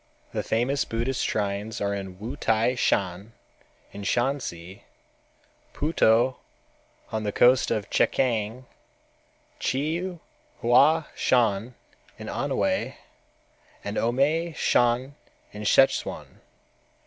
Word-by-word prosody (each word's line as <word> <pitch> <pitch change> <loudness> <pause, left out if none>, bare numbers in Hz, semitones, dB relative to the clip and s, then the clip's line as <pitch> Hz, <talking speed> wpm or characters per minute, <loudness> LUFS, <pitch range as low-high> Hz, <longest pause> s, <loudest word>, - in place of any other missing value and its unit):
The - - -1
famous 125 +5 0
Buddhist 120 +3 -2
shrines 105 +2 -2
are 100 0 -1 0.2
Wu 105 +8 -7
T'ai 115 -3 +1
Shan 100 -1 -1 0.6
in 100 - -8
Shansi, 100 -5 -2 0.9
Puto 130 -5 +2 0.7
on 110 - -2
the 105 -1 -2
coast 125 +4 +4
of 105 -2 -1
Chekiang, 120 0 0 0.9
Chiu 170 - -2 0.4
Hua 145 +7 +5
Shan 115 -1 +1 0.4
in - - -8
Anhwei, - - -1 0.9
and 100 - -4
Omei 150 +9 +1
Shan 120 +3 +2 0.4
in 105 0 -8
Szechuan. 135 +5 +2
120 Hz, 90 wpm, -26 LUFS, 105-135 Hz, 0.9 s, Hua